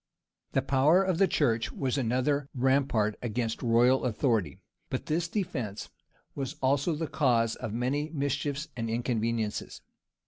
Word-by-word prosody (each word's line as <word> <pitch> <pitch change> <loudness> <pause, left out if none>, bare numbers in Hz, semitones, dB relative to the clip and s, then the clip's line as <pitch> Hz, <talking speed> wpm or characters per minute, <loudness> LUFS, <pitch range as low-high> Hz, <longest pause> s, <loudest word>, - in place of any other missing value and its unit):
] - - -57
The - - +2
power 150 +8 +4
of 185 -3 0
the 195 - +5
church 115 -10 +1
was 130 -3 -2
another 135 +3 0
rampart 130 -5 +1
against 115 -1 -2
royal 120 +2 +3
authority; 110 - 0 0.3
but - - -3
this 165 +2 0
defence 125 - -3 0.4
was 135 -2 -4
also 140 +5 +1
the 160 +2 -2
cause 120 -7 +1
of 110 - -5
many 130 +7 -1
mischiefs 145 0 -2
and 115 -2 -3
inconveniencies. 115 -2 -2
130 Hz, 140 wpm, -29 LUFS, 115-145 Hz, 0.4 s, the